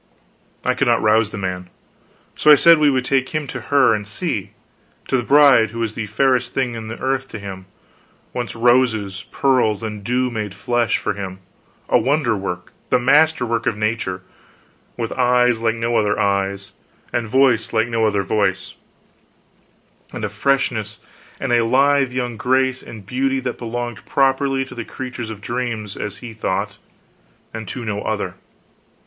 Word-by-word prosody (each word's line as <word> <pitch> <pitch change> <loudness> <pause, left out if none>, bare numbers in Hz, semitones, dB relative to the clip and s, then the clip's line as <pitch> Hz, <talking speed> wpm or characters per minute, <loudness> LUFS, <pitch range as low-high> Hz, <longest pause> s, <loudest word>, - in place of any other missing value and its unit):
I - - +3
could - - 0
not - - +2
rouse 110 0 +3
the 105 - -7
man; 90 -2 -4 0.7
so 150 - +2
I 150 - +11
said 165 +2 +6
we 150 -1 +5
would 130 -2 0
take 130 -1 +1
him 155 -2 -2
to - - -6
her, 140 -5 +5
and 105 -1 -3
see 105 - -3 0.6
to - - 0
the 125 - +2
bride 135 -3 +5
who 115 - -9
was 115 -2 -2
the 110 -2 -4
fairest 125 +3 +1
thing 130 -3 0
in 115 -1 -6
the 110 - -6
earth 135 0 -1
to 110 - -8
him, 95 -2 -8 0.7
once 120 -1 -4
roses, 115 -5 +2
pearls, 125 -6 +1
and 105 -2 -5
dew 125 +3 0
made 105 -4 -4
flesh, 120 +1 0
for - - -2
him; 95 -2 -6 0.5
a - - +4
wonder 135 -5 +1
work, 90 -3 -5 0.2
the 125 - +4
master 150 +3 +3
work 115 +2 -1
of 115 -4 0
nature: 105 -4 -2 0.7
with 115 -2 -3
eyes 125 -2 +3
like 115 0 +1
no 115 +1 -1
other 105 -1 +1
eyes, 100 0 -1 0.4
and 120 -2 -1
voice 130 -2 +3
like 110 0 +1
no 115 -2 +1
other 100 -2 0
voice, 95 -2 -1 1.4
and 110 - -4
a - - -3
freshness, 110 -2 -1 0.4
and - - -2 0.2
lithe 135 +1 +3
young 125 -2 -3
grace, 130 +3 +1
and 110 -4 -11
beauty, 135 +4 0
that 125 -1 -4
belonged 120 -1 -5
properly 135 0 +1
to - - -11
the 120 - -5
creatures 125 -1 -6
of 105 -2 -8
dreams 115 -3 -4
as 100 -1 -5
he 115 - -7
thought 100 -4 -3 0.7
and 110 -1 -6
to 120 -3 -6
no 105 -1 -2
other. - - -2
115 Hz, 170 wpm, -20 LUFS, 105-130 Hz, 1.4 s, I